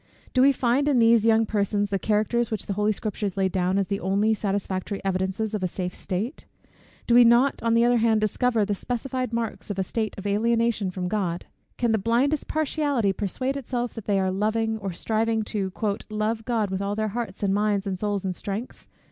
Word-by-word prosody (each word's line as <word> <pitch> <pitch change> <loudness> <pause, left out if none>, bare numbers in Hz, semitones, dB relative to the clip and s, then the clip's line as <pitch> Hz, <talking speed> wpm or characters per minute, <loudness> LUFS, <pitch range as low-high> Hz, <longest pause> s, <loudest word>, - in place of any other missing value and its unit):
Do 255 - +4
we 275 +2 +7
find 260 +2 +1
in 285 -3 +3
these 230 -1 +5
young 225 0 +4
persons 205 -1 0
the 195 - 0
characters, 220 +4 +1
which 220 - -3
the 200 - -2
holy 210 +2 +1
Scriptures 205 -2 -3
lay 190 -1 +2
down 185 0 0
as 200 - +2
the 200 +1 -2
only 200 +4 +2
satisfactory 200 -1 -2
evidences 190 +3 -1
of 210 - -2
a 185 - +1
safe 180 0 -4
state? 215 - -4 0.6
Do 235 - +2
we 245 +1 +8
not 240 +4 +4
on 230 0 +2
the 230 +1 +4
other 245 0 +4
hand 220 -1 +3
discover 220 +1 +1
the 205 - -1
specified 250 +3 -3
marks 230 -2 -3
of 205 - -3
a 190 - +1
state 220 +3 -3
of 195 - -8
alienation 225 0 +1
from 180 0 -4
God? 180 -4 -2 0.3
Can 240 -2 +1
the 220 - +2
blindest 250 +8 +1
partiality 285 -8 0
persuade 255 +8 -2
itself 245 -3 -3
that 225 -3 -8
they 200 -2 +2
are 190 -1 +1
loving, 220 +3 0
or 195 -2 -4
striving 220 +4 0
"to 200 -3 -3 0.4
love 215 +1 -2
God 220 -5 0
with 190 0 -2
all 200 +1 -1
their 215 0 -1
hearts, 215 -3 -5
and 195 -1 +2
minds, 205 -1 +1
and 190 -2 -3
souls, 205 -1 -1
and 185 -1 -2
strength?" 205 +7 -6
215 Hz, 210 wpm, -25 LUFS, 195-235 Hz, 0.6 s, we